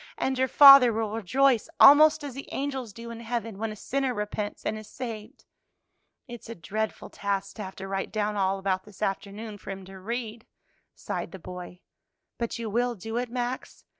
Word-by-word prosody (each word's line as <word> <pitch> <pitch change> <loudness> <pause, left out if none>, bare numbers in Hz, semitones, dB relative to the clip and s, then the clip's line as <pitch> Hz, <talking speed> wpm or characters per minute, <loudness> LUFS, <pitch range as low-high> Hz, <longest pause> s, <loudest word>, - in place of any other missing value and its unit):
"And 265 - 0
your 260 - +3
father 275 -2 +9
will 220 -1 -2
rejoice 235 +3 +2
almost 305 +2 +8
as 285 -3 -6
the 275 +2 -8
angels 270 -5 -3
do 230 +3 -9
in 230 - -8
heaven 230 -3 -4
when 225 0 -2
a - - -7
sinner 265 +3 -2
repents 210 0 -4
and 215 - -1
is 215 -1 -9
saved." 230 0 -8 0.8
"It's 240 -2 -10
a 230 - -6
dreadful 215 +5 -4
task 200 -1 -3
to 210 - -4
have 190 0 -8
to 195 - -7
write 195 0 -3
down 210 -1 -1
all 195 -1 +1
about 190 -1 -1
this 210 0 -9
afternoon 205 +2 -4
for - - -11
him 195 -1 -6
to 190 0 -11
read," 230 +2 -5 0.5
sighed - - -5
the 190 - -8
boy. 180 0 -9 0.6
"But 235 -1 -2
you 230 -1 -4
will 240 +3 0
do 225 +4 -5
it, 245 0 -2
Max? 245 +1 -5
220 Hz, 195 wpm, -27 LUFS, 200-245 Hz, 0.8 s, father